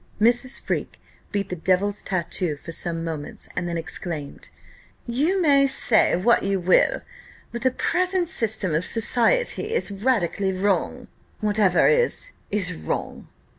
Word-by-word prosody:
Mrs. 245 +4 +3
Freke - - -4 0.3
beat 200 -1 -2
the 180 - -3
devil's 190 +4 0
tattoo 175 -3 -2
for 165 - -10
some 165 0 -1
moments, 160 -3 -6
and 175 -1 -2
then 170 - -3
exclaimed, 160 -2 -6 0.6
"You 295 +11 0
may 280 -5 +4
say 255 -4 +3
what 220 +7 +3
you 195 -1 -1
will, 180 +1 +2 0.5
but 235 - -6
the 260 - +3
present 360 +6 0
system 220 - +1
of 155 +3 +1
society 420 - +1
is 470 - -1
radically 200 -3 0
wrong: 195 +1 -1 0.3
whatever 210 -4 +3
is, 485 +1 +1 0.2
is 205 -1 -1
wrong." 80 0 -5
205 Hz, 135 wpm, -23 LUFS, 180-260 Hz, 0.6 s, may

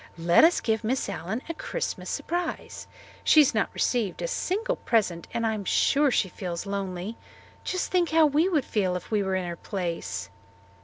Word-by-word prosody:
Let 170 - +5
us 335 +2 +5
give 220 -1 0
Miss 255 +4 0
Allen 200 +6 -4
a 330 - -3
Christmas - - -4
surprise. 350 +1 -3 0.4
She 310 - +6
has 280 - +3
not 220 - +1
received 225 -7 -1
a - - 0
single 455 +2 -1
present 190 -7 0
and 230 - -1
I'm 220 -2 -1
sure 280 +9 +3
she 225 - +2
feels 175 -2 -5
lonely. 195 +1 -4 0.5
Just 370 -1 -2
think 355 -2 +2
how 320 0 +5
we 305 +5 +3
would 305 -8 +1
feel 190 -4 0
if 180 - -6
we 210 -2 +2
were 190 -1 -1
in 185 -1 -2
her 170 - -4
place." 170 - -4
220 Hz, 185 wpm, -26 LUFS, 185-315 Hz, 0.5 s, She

